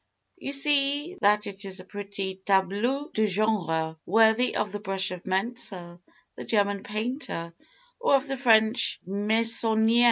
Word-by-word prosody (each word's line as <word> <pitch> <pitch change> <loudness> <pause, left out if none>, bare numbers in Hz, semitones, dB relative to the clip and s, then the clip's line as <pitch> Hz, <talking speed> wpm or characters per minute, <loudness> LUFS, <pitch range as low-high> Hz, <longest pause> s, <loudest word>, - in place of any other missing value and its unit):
"You 275 - -5
see 285 +3 +1
that 210 +1 +3
it 200 0 -7
is 190 -1 -3
a 185 - -11
pretty 195 -1 -6
tableau 205 +9 0
de 220 0 +1
genre, 175 -6 -1
worthy 220 +4 +3
of 205 - -1
the 205 - -5
brush 195 -2 -1
of 180 -1 -7
Mentzel, 190 -4 -3 0.3
the - - -8
German 200 -2 0
painter, 215 - -4 0.5
or 475 -11 +3
of 275 +1 0
the 270 - -3
French 225 -1 +3
Meissonier. 220 +3 +2
210 Hz, 140 wpm, -26 LUFS, 195-235 Hz, 0.5 s, that